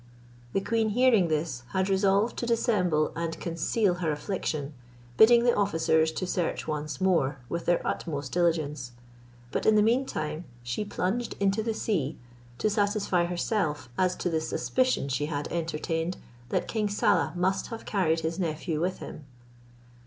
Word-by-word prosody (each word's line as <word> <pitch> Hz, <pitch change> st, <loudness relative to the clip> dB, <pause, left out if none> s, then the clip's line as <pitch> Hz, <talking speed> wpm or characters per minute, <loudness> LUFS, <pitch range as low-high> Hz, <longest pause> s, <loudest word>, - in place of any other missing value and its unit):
The 195 Hz, -, +1 dB
queen 225 Hz, +1 st, +1 dB
hearing 225 Hz, -4 st, +4 dB
this, 155 Hz, -5 st, -1 dB
had 190 Hz, 0 st, +1 dB
resolved 200 Hz, +3 st, +2 dB
to 240 Hz, -, -2 dB
dissemble 185 Hz, -10 st, +2 dB
and 165 Hz, -1 st, -3 dB
conceal 175 Hz, +4 st, +1 dB
her 160 Hz, -3 st, +1 dB
affliction, 150 Hz, -2 st, -3 dB, 0.4 s
bidding 235 Hz, -, +7 dB
the 240 Hz, 0 st, +4 dB
officers 160 Hz, -5 st, +2 dB
to 185 Hz, -, -2 dB
search 180 Hz, -1 st, -2 dB
once 150 Hz, -2 st, -3 dB
more 165 Hz, -8 st, +2 dB
with 170 Hz, 0 st, -3 dB
their 175 Hz, -, +2 dB
utmost 145 Hz, -5 st, -3 dB
diligence; 150 Hz, -7 st, 0 dB, 0.6 s
but -, -, -1 dB
in 220 Hz, -, +6 dB
the 210 Hz, -, +5 dB
meantime 220 Hz, -, 0 dB, 0.2 s
she 120 Hz, +11 st, -2 dB
plunged 205 Hz, +3 st, -2 dB
into 200 Hz, +2 st, +2 dB
the 225 Hz, 0 st, -2 dB
sea, 160 Hz, -11 st, -1 dB, 0.4 s
to -, -, +1 dB
satisfy 205 Hz, -4 st, +1 dB
herself 170 Hz, -, -1 dB
as 185 Hz, +3 st, +1 dB
to -, -, -3 dB
the 160 Hz, -1 st, +1 dB
suspicion 255 Hz, -, 0 dB
she 140 Hz, +2 st, -1 dB
had 145 Hz, -2 st, -3 dB
entertained 165 Hz, +1 st, -2 dB, 0.3 s
that -, -, 0 dB
king 215 Hz, -2 st, -1 dB
Saleh 180 Hz, -5 st, +2 dB
must 185 Hz, +2 st, 0 dB
have 230 Hz, -1 st, -7 dB
carried 165 Hz, -5 st, +1 dB
his 165 Hz, +3 st, -2 dB
nephew 160 Hz, -2 st, -2 dB
with 180 Hz, +2 st, 0 dB
him. 150 Hz, -, -9 dB
175 Hz, 155 wpm, -28 LUFS, 155-205 Hz, 0.6 s, bidding